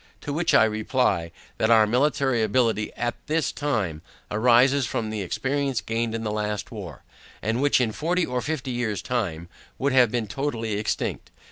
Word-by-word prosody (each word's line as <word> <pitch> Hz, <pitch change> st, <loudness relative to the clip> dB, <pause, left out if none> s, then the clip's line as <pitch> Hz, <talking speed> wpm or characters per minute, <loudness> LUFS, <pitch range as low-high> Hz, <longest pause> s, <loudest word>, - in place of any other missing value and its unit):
To 145 Hz, -, -4 dB
which 165 Hz, +3 st, +2 dB
I -, -, +7 dB
reply, 110 Hz, -5 st, 0 dB, 0.3 s
that 110 Hz, -, +2 dB
our 110 Hz, -2 st, +6 dB
military 130 Hz, +1 st, +1 dB
ability 110 Hz, -1 st, +1 dB
AT 120 Hz, 0 st, -1 dB
THIS 160 Hz, +1 st, +1 dB
TIME, 110 Hz, -, -2 dB, 0.3 s
arises 125 Hz, +5 st, +4 dB
from 110 Hz, -2 st, -2 dB
the 110 Hz, -1 st, -3 dB
experience 135 Hz, +7 st, -1 dB
gained 115 Hz, +2 st, -2 dB
in 115 Hz, -, -3 dB
the 105 Hz, -, -2 dB
last 105 Hz, -1 st, -3 dB
war, 95 Hz, -, -8 dB, 0.4 s
and 115 Hz, +4 st, -1 dB
which 145 Hz, -1 st, +4 dB
in 120 Hz, -3 st, +1 dB
forty 170 Hz, +8 st, 0 dB
or 125 Hz, 0 st, -2 dB
fifty 140 Hz, -3 st, -3 dB
years 110 Hz, -7 st, -2 dB
time, 90 Hz, -10 st, -2 dB, 0.3 s
would 140 Hz, 0 st, 0 dB
have 125 Hz, -3 st, +6 dB
been 120 Hz, 0 st, -1 dB
totally 115 Hz, -2 st, -3 dB
extinct. 105 Hz, -, -2 dB
115 Hz, 170 wpm, -25 LUFS, 110-135 Hz, 0.4 s, I